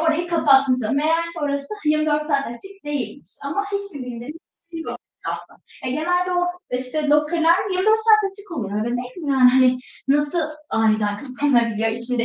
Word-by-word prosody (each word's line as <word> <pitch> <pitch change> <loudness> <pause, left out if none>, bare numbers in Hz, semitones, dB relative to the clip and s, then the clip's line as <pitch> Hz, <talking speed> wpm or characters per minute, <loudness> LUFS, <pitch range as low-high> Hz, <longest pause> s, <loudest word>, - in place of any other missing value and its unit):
orayı 330 +1 +1
kapatmışlar. 270 -8 +3
Meğerse 330 +4 0
orası, 280 +4 -2
hani, 300 - +4
24 305 -1 +1
saat 280 -2 +1
açık 390 +11 -10
değilmiş 245 - -5
ama 305 +9 -1
hiçbir 400 -11 -4
bildirim 245 +5 -7 0.3
hiçbir 335 0 -12
şey 325 - -4
yok - - -6 0.2
etrafta. - - -6 0.3
E, 255 - -1
genelde 355 +5 0
o, 355 0 +2 0.2
işte, 255 +4 -2
locker'lar 320 +3 +4 0.2
24 430 +4 +3
saat 430 -3 +5
açık 405 0 -13
olur 205 -6 -3
öyle, 235 +4 -1
değil 250 +1 -6
mi? 315 -5 -4
Yani, 255 -2 +6
hani, 255 0 +5 0.3
nasıl 295 +4 +2 0.3
aniden 215 -2 +2
kapanabiliyor 240 -4 +1
içinde 235 +1 -1
290 Hz, 165 wpm, -22 LUFS, 250-335 Hz, 0.3 s, Yani